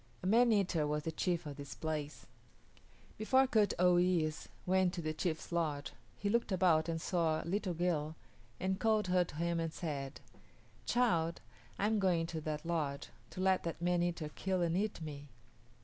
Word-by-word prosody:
A -, -, -4 dB
man 230 Hz, +5 st, +5 dB
eater 180 Hz, -7 st, +2 dB
was 150 Hz, 0 st, -1 dB
the 160 Hz, -, -2 dB
chief 175 Hz, +1 st, -1 dB
of 145 Hz, -1 st, -6 dB
this 140 Hz, -1 st, -7 dB
place. 155 Hz, -2 st, -4 dB, 0.9 s
Before 260 Hz, +5 st, +4 dB
Kut 215 Hz, -6 st, +2 dB
o 180 Hz, 0 st, +5 dB
yis´ 170 Hz, -4 st, +1 dB, 0.2 s
went 185 Hz, 0 st, +2 dB
to 175 Hz, -, -3 dB
the 155 Hz, 0 st, -1 dB
chief's 160 Hz, 0 st, -3 dB
lodge 155 Hz, -4 st, -1 dB, 0.2 s
he 205 Hz, -, -3 dB
looked 230 Hz, +1 st, +1 dB
about 170 Hz, -3 st, +3 dB
and 165 Hz, -1 st, -1 dB
saw 160 Hz, -2 st, 0 dB
a -, -, -12 dB
little 185 Hz, 0 st, -1 dB
girl 160 Hz, -3 st, 0 dB, 0.4 s
and 190 Hz, +1 st, -1 dB
called 215 Hz, -3 st, +2 dB
her 180 Hz, 0 st, +4 dB
to 165 Hz, -, -10 dB
him 170 Hz, +1 st, 0 dB
and 165 Hz, -1 st, -1 dB
said, 140 Hz, -5 st, -5 dB, 0.7 s
"Child, 170 Hz, -10 st, +2 dB, 0.4 s
I 200 Hz, -, 0 dB
am 215 Hz, 0 st, +2 dB
going 180 Hz, -4 st, +2 dB
into 165 Hz, -1 st, -4 dB
that 155 Hz, +1 st, -4 dB
lodge, 155 Hz, -5 st, -2 dB, 0.2 s
to 185 Hz, -, -6 dB
let 190 Hz, 0 st, +3 dB
that 170 Hz, -1 st, -4 dB
man 175 Hz, 0 st, +1 dB
eater 170 Hz, -3 st, -1 dB
kill 185 Hz, +3 st, -1 dB
and 170 Hz, 0 st, +1 dB
eat 205 Hz, +1 st, -1 dB
me. 145 Hz, -2 st, -7 dB
170 Hz, 185 wpm, -34 LUFS, 155-190 Hz, 0.9 s, man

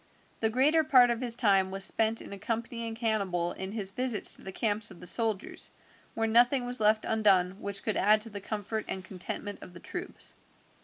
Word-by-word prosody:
The 220 Hz, -, +1 dB
greater 290 Hz, +7 st, +3 dB
part 250 Hz, -5 st, +5 dB
of 235 Hz, +1 st, -2 dB
his 240 Hz, -2 st, -1 dB
time 195 Hz, -5 st, +3 dB
was 195 Hz, 0 st, 0 dB
spent 225 Hz, 0 st, +1 dB
in -, -, -8 dB
accompanying 230 Hz, +2 st, -4 dB
Hannibal 200 Hz, -7 st, -1 dB
in 190 Hz, +1 st, -6 dB
his 205 Hz, -3 st, -2 dB
visits 245 Hz, -1 st, +2 dB
to -, -, -10 dB
the 190 Hz, -, -7 dB
camps 210 Hz, +1 st, 0 dB
of 190 Hz, -, -13 dB
the -, -, -11 dB
soldiers, 220 Hz, +2 st, -1 dB, 0.5 s
where 225 Hz, -, 0 dB
nothing 245 Hz, +3 st, +3 dB
was 245 Hz, -1 st, 0 dB
left 215 Hz, 0 st, +3 dB
undone 195 Hz, -4 st, +2 dB
which 200 Hz, 0 st, -3 dB
could 215 Hz, -, -1 dB
add 210 Hz, +2 st, +4 dB
to 225 Hz, +1 st, -5 dB
the 200 Hz, 0 st, -7 dB
comfort 215 Hz, +1 st, -4 dB
and 190 Hz, -1 st, -5 dB
contentment 200 Hz, +2 st, -6 dB
of 180 Hz, -, -12 dB
the -, -, -9 dB
troops. 360 Hz, -, -6 dB
215 Hz, 200 wpm, -29 LUFS, 195-230 Hz, 0.5 s, part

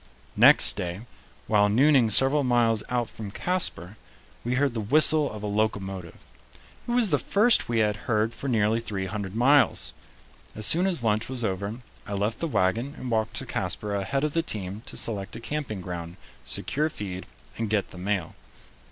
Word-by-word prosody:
Next -, -, +7 dB
day, 90 Hz, +2 st, -4 dB, 0.4 s
while 105 Hz, -1 st, +3 dB
nooning 130 Hz, +1 st, +4 dB
several 135 Hz, +6 st, +3 dB
miles 120 Hz, -3 st, +2 dB
out 120 Hz, -2 st, -1 dB
from 110 Hz, -2 st, -8 dB
Casper, 110 Hz, -, -1 dB, 0.5 s
we 120 Hz, +2 st, -1 dB
heard 135 Hz, -1 st, +1 dB
the 115 Hz, -, -3 dB
whistle 150 Hz, +6 st, +4 dB
of 105 Hz, -1 st, -8 dB
a -, -, -3 dB
locomotive. 100 Hz, -4 st, -3 dB, 0.6 s
It -, -, -2 dB
was 235 Hz, -6 st, +2 dB
the 145 Hz, -, +3 dB
first 215 Hz, -, +2 dB
we 120 Hz, -, 0 dB
had 105 Hz, 0 st, -2 dB
heard 110 Hz, 0 st, -1 dB
for 125 Hz, +5 st, -6 dB
nearly 110 Hz, -2 st, +1 dB
three 100 Hz, -4 st, -4 dB
hundred 100 Hz, 0 st, -5 dB
miles. 135 Hz, +5 st, +3 dB, 0.6 s
As 110 Hz, -, 0 dB
soon 175 Hz, -, +5 dB
as 170 Hz, -10 st, -1 dB
lunch 110 Hz, 0 st, 0 dB
was 130 Hz, -2 st, -3 dB
over, 100 Hz, +3 st, -3 dB, 0.3 s
I 100 Hz, -, -5 dB
left 105 Hz, +3 st, -1 dB
the 165 Hz, -, -2 dB
wagon 115 Hz, +3 st, 0 dB
and 125 Hz, -, -6 dB
walked 110 Hz, -1 st, -1 dB
to -, -, -2 dB
Casper 105 Hz, -1 st, -3 dB
ahead 100 Hz, +8 st, -1 dB
of 150 Hz, -1 st, -1 dB
the 165 Hz, -, +2 dB
team 100 Hz, -, -4 dB
to -, -, -8 dB
select 100 Hz, -4 st, -3 dB
a -, -, -7 dB
camping 120 Hz, -6 st, -4 dB
ground, 85 Hz, -1 st, -7 dB, 0.3 s
secure 155 Hz, +2 st, -2 dB
feed, 95 Hz, -9 st, -7 dB, 0.3 s
and 115 Hz, -2 st, -2 dB
get 105 Hz, -2 st, -1 dB
the 90 Hz, -, -10 dB
mail. 95 Hz, -3 st, -2 dB
110 Hz, 180 wpm, -26 LUFS, 100-135 Hz, 0.6 s, Next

